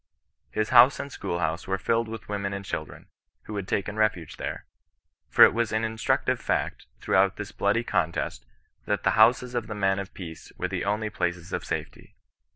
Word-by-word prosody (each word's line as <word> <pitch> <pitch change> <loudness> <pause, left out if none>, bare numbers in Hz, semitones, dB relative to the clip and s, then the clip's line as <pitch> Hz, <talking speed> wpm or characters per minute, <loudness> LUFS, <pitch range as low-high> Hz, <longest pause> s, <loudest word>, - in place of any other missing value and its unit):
His 110 0 -1
house 125 +2 +7
and 140 - -5
schoolhouse 85 -5 -2
were 95 0 0
filled 115 +4 0
with 110 -1 -8
women 100 -1 -3
and 100 0 -5
children, - - -6 0.4
who 105 - -7
had 100 -2 -4
taken 100 +1 -2
refuge 105 -7 0
there: - - -5 0.6
for - - +7
it - - +8
was 115 -1 0
an 110 0 0
instructiye 110 0 0
fact, - - -2
throughout 95 0 +3
this 105 0 -6
bloody 105 +4 +1
contest^ 85 - -1 0.5
that 105 - -1
the 95 - +3
houses 120 +4 +4
of 120 -3 -2
the 105 - -5
men 95 -1 +1
of 100 -1 -7
peace 85 -4 -9
were - - -1
the - - -3
onlv 105 +1 -1
places 90 0 -2
of - - -2
safety. - - -6
105 Hz, 185 wpm, -26 LUFS, 95-110 Hz, 0.6 s, it